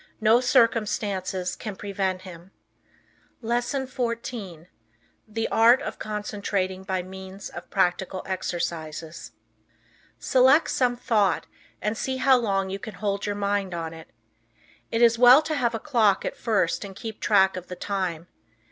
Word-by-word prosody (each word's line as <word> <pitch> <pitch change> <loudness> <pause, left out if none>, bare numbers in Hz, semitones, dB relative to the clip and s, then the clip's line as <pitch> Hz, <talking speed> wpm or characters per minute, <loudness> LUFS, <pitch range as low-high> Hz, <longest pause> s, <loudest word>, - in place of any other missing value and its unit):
No 225 +1 +5
circumstances 205 -6 +1
can 215 -3 -6
prevent 190 -2 -3
him. 180 -1 -11 0.9
LESSON 240 +4 -1
XIV. 235 -9 -4 0.6
THE 225 +1 -2
ART 235 +3 +5
OF - - -6
CONCENTRATING 200 -3 -3
BY 190 -2 -2
MEANS 190 +1 -9
OF - - -10
PRACTICAL 190 -1 0
EXERCISES 165 -3 -4 0.8
Select 265 +4 +4
some 245 -2 +1
thought, 220 -6 +1 0.4
and 210 +2 0
see 260 +3 -2
how 265 0 +5
long 195 -5 -1
you 195 - -4
can 220 -2 -8
hold 200 +1 -2
your 205 - -1
mind 200 -2 -1
on 165 -1 -4
it. 160 -1 -12 0.8
It 230 +1 +2
is 230 -1 +5
well 250 +5 +8
to 310 0 -3
have 240 -5 0
a - - -3
clock 220 -8 +2
at - - -3
first 210 -7 0
and 195 -1 -9
keep 220 -1 -7
track 190 -2 +3
of 180 -1 -7
the 180 - -6
time. 180 -4 -3
205 Hz, 145 wpm, -25 LUFS, 185-235 Hz, 0.9 s, well